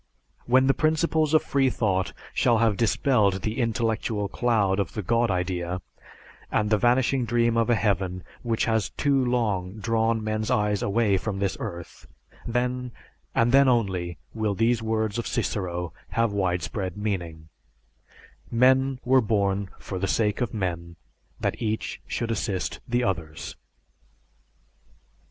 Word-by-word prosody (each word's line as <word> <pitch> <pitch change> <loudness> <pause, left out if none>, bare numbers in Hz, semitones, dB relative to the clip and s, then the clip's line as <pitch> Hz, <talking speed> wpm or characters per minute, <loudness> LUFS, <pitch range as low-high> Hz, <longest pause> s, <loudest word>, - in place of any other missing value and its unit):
When 130 +2 +5
the 135 - +4
principles 155 0 +1
of 155 - +4
freethought 110 -9 +1 0.2
shall 120 -2 +3
have 110 -2 +3
dispelled 105 -3 +2
the 110 +3 -2
intellectual 115 -3 0
cloud 105 -4 +1
of 100 - -2
the 105 - -4
God 115 +4 +2
idea 90 -1 -1 0.7
and 105 0 +1
the 110 - +5
vanishing 125 +2 +2
dream 120 0 +1
of 115 0 +2
a 120 - +5
heaven 95 -4 0 0.2
which 115 -2 0
has 110 -2 +1
too 140 -2 +1
long 105 -7 0
drawn 115 0 0
men's 110 0 -2
eyes 105 -1 +1
away 100 -1 +2
from 100 +1 -3
this 100 -1 -1
earth, 85 -1 -7 0.4
then, 125 +1 -1 0.4
and 115 +1 +3
then 135 +1 +6
only, 95 -8 0 0.2
will 110 -2 -1
these 115 +2 +2
words 110 0 -1
of 120 - -3
Cicero 90 -4 -2 0.2
have 115 -2 +1
widespread 90 0 -2
meaning: 85 -6 -4 1.0
"Men 130 +2 +3
were 130 +1 +5
born 100 -3 0
for 95 - -6
the 95 - -1
sake 105 +2 +1
of 120 -4 0
men, 85 -4 -3 0.4
that - - -2
each 110 -1 -2
should 115 -1 -2
assist 100 -4 -2
the 120 +1 +1
others." 80 -7 -3
110 Hz, 140 wpm, -25 LUFS, 95-120 Hz, 1.0 s, then